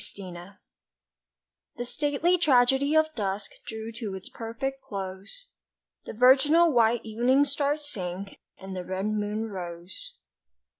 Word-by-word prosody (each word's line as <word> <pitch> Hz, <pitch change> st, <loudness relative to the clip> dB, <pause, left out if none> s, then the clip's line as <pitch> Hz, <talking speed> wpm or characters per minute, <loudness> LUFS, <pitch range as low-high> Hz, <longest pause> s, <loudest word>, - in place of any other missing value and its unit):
TWILIGHT 185 Hz, 0 st, -9 dB, 1.2 s
THE 240 Hz, -, -4 dB
stately 290 Hz, +6 st, +1 dB
tragedy 270 Hz, -1 st, +4 dB
of 315 Hz, 0 st, +3 dB
dusk 200 Hz, -4 st, -3 dB, 0.2 s
Drew 220 Hz, 0 st, -5 dB
to 210 Hz, -5 st, -4 dB
its 190 Hz, -, -8 dB
perfect 270 Hz, +4 st, -5 dB
close, 200 Hz, -, -7 dB, 0.6 s
The -, -, -6 dB
virginal 275 Hz, +8 st, +5 dB
white 235 Hz, -2 st, +3 dB
evening 245 Hz, +6 st, +3 dB
star 285 Hz, +1 st, 0 dB
Sank, 195 Hz, -10 st, -6 dB, 0.2 s
and 190 Hz, 0 st, -8 dB
the 180 Hz, -, -4 dB
red 185 Hz, +2 st, -3 dB
moon 215 Hz, +1 st, -1 dB
rose. 180 Hz, -, -7 dB
225 Hz, 120 wpm, -27 LUFS, 195-280 Hz, 1.2 s, virginal